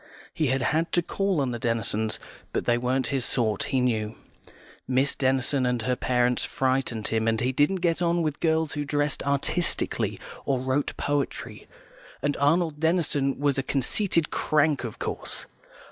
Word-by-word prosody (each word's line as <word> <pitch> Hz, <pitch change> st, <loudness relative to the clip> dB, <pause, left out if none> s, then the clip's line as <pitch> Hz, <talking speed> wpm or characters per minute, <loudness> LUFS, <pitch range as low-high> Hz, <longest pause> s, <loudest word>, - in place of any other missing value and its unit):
He 155 Hz, -4 st, 0 dB
had 130 Hz, 0 st, +1 dB
had 160 Hz, +6 st, +1 dB
to 175 Hz, -, +3 dB
call 195 Hz, -1 st, 0 dB
on 135 Hz, -3 st, 0 dB
the 120 Hz, -, -4 dB
Denisons, 110 Hz, -1 st, 0 dB, 0.4 s
but -, -, -1 dB
they 120 Hz, -, +3 dB
weren't 125 Hz, +2 st, 0 dB
his 135 Hz, -2 st, +1 dB
sort, 115 Hz, -4 st, +1 dB
he 130 Hz, -, 0 dB
knew. 110 Hz, -3 st, 0 dB, 0.7 s
Miss 130 Hz, +2 st, +2 dB
Denison 130 Hz, 0 st, +1 dB
and 125 Hz, -2 st, 0 dB
her 125 Hz, +1 st, +1 dB
parents 125 Hz, 0 st, +1 dB
frightened 130 Hz, -4 st, -1 dB
him, 110 Hz, 0 st, 0 dB
and 110 Hz, 0 st, +2 dB
he 125 Hz, +3 st, +1 dB
didn't 150 Hz, +8 st, +1 dB
get 165 Hz, 0 st, +1 dB
on 170 Hz, 0 st, +2 dB
with 150 Hz, -2 st, -2 dB
girls 160 Hz, -1 st, +1 dB
who 145 Hz, -, -2 dB
dressed 145 Hz, 0 st, 0 dB
artistically, 140 Hz, +5 st, 0 dB, 0.2 s
or 135 Hz, -2 st, 0 dB
wrote 130 Hz, +3 st, -1 dB
poetry, 145 Hz, -1 st, -3 dB, 0.6 s
and 145 Hz, 0 st, +1 dB
Arnold 155 Hz, +1 st, +2 dB
Denison 150 Hz, -5 st, +1 dB
was 140 Hz, -1 st, +1 dB
a -, -, +2 dB
conceited 155 Hz, -, +1 dB
crank, 150 Hz, -2 st, +2 dB
of 115 Hz, -3 st, -6 dB
course. -, -, -3 dB
135 Hz, 165 wpm, -26 LUFS, 125-155 Hz, 0.7 s, to